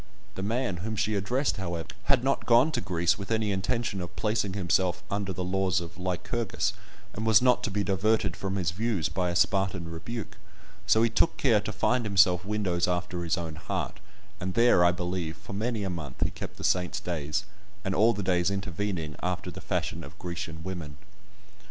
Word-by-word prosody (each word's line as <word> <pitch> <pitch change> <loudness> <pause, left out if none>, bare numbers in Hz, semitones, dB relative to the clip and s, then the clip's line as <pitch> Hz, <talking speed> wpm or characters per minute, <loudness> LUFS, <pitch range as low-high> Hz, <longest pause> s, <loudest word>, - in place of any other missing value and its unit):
The 95 - -5
man 110 -1 -1
whom 110 +6 -3
she 105 +1 0
addressed, 120 +8 0
however, 85 -4 -4 0.2
had 135 -3 +3
not 135 +1 0
gone 125 +6 +6
to 125 -5 -1
Greece 85 -3 +1
with 100 - -6
any 110 -2 +1
intention 95 +1 -1
of 90 - -7
placing 105 -3 0
himself 90 -2 +1
under 100 -1 -1
the 90 0 -3
laws 95 0 +1
of 85 -1 -8
Lycurgus, 95 +3 -1 0.4
and 110 - -4
was 110 -2 +6
not 125 -1 +4
to - - -1
be 100 +1 0
diverted 100 0 +1
from 95 0 -3
his 90 -4 0
views 100 -3 0
by 90 -2 0
a 85 - -2
Spartan 95 -2 +1
rebuke, 100 +7 -6 0.5
so 110 - +5
he 115 - +4
took 165 +8 +2
care 115 -6 +4
to 105 - -4
find 125 +4 +1
himself 95 -4 +4
windows 95 -4 0
after 90 0 -1
his 85 0 +1
own 85 -2 -4
heart, 80 - -3 0.4
and 90 +1 -3
there, 115 -6 +6
I 85 - +6
believe, 90 -2 -3
for - - -10
many 110 +1 -1
a 95 - -1
month, 80 -7 -4
he - - +1
kept - - -7
the - - -8
saints' 90 -1 +1
days, 85 +3 -2 0.4
and 95 - 0
all 110 +5 +5
the 100 - -3
days 90 -1 +2
intervening, 95 -5 -3
after 90 0 -2
the - - -9
fashion - - -2
of - - -11
Grecian 85 -2 -5
women. 85 -6 -6
95 Hz, 195 wpm, -28 LUFS, 90-110 Hz, 0.5 s, gone